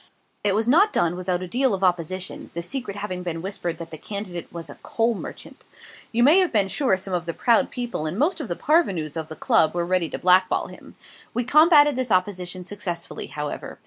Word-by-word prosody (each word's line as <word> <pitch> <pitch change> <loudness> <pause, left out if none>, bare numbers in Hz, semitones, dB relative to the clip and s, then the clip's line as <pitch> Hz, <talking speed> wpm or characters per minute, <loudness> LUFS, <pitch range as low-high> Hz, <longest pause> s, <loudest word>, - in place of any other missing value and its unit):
It 200 -2 +2
was 220 +2 0
not 375 - +5
done 170 - +1
without 180 0 -2
a - - -5
deal 250 +2 +1
of 195 - -6
opposition 180 +1 -1
the 170 - -3
secret 245 +1 -4
having 185 -3 -4
been 170 -2 -4
whispered 175 -4 -3
that 165 0 -9
the 160 - -8
candidate 200 -5 -5
was 170 -1 -7
a - - -12
coal 230 +1 0
merchant. 210 - -9 0.5
You 235 +1 +2
may 330 +9 +6
be 205 - +3
sure 245 -4 +2
some 190 0 -6
of 175 -1 -2
the 170 - -3
proud 235 -2 +3
people 240 -11 -3
and 165 +5 -3
most 315 +6 +1
of 275 - -5
the 175 - -3
parvenus 185 - +1
of 160 -1 -4
the 155 - -8
Club 160 +1 +2
were 175 -1 0
ready 180 -2 +1
to - - -4
blackball 185 +1 +3
him. - - -14 0.4
We 245 - +1
combated 295 +1 +6
this 255 -2 -2
opposition 185 -1 -1
successfully, 175 -4 -5
however. 150 -1 -6
185 Hz, 210 wpm, -24 LUFS, 175-240 Hz, 0.5 s, may